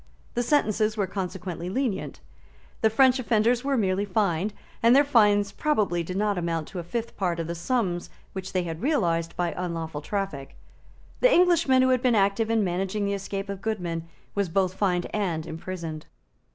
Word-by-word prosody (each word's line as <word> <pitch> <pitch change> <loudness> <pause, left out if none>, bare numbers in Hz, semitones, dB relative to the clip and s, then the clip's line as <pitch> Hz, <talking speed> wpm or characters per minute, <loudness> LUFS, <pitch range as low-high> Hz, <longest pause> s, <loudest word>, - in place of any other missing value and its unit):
The 240 - 0
sentences 220 -5 +1
were 200 - +1
consequently 185 -2 -5
lenient. 195 - -2 0.6
The 220 - +5
French 260 +3 +4
offenders 235 0 +2
were 275 -1 +1
merely 195 -2 +1
fined; 200 -1 0 0.3
and 235 +2 +6
their 285 - +7
fines 210 -7 +4
probably 210 - 0
did 180 +3 -4
not 205 -2 +1
amount 165 -2 -2
to 185 - -6
a - - -4
fifth 230 +7 -4
part 175 -3 -1
of 165 - -2
the 170 - -3
sums 175 -2 -1 0.2
which 190 -1 -5
they 185 -1 0
had 165 0 -5
realised 170 - 0
by 175 -1 0
unlawful 165 -4 -4
traffic. 195 -6 -4 0.6
The - - +5
Englishman 335 - +4
who 260 - +3
had 255 -1 +3
been 250 -2 +3
active 200 +2 +2
in 225 -2 +2
managing 190 +3 -1
the 200 - 0
escape 195 0 -4
of 200 -1 -6
Goodman 175 -6 -3 0.3
was 200 -3 0
both 185 +1 +1
fined 180 -3 0
and 175 -7 -1
imprisoned. 165 -1 -6
195 Hz, 180 wpm, -26 LUFS, 175-225 Hz, 0.6 s, their